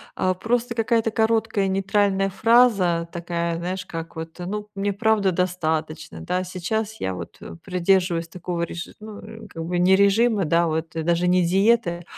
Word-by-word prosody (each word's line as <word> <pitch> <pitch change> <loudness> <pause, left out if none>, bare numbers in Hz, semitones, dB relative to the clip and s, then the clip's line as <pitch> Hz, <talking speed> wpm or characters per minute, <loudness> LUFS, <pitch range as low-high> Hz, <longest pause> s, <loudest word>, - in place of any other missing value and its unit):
Э, 185 0 +1
просто 240 +1 0
какая-то 225 -1 +1
короткая 220 -3 +1
нейтральная 195 0 +1
фраза, 195 -5 +3
такая, 170 -1 -3
знаешь, 180 +2 -4
как 165 -1 -7
вот, 160 +2 -8
э, 175 - -5
ну: 210 +2 -4
"Мне 200 +1 -1
правда 210 -2 +2
достаточно"- 160 - -2
да- 180 - -1
"Сейчас 210 +5 -3
я 95 - -2
вот, - - -8
э, 85 - -9
придерживаюсь 180 -2 +1
такого 175 -1 -5
реж"- 170 0 -5
ну, 220 +1 -10
как 165 -1 -7
бы 175 +1 -2
не 185 +2 +5
режима, 200 0 +3
да, 170 +2 +2
вот, 160 +1 -3
э, 160 - -2
даже 170 +1 +1
не 180 0 +3
диеты, 190 -2 +2
185 Hz, 170 wpm, -23 LUFS, 170-210 Hz, -, не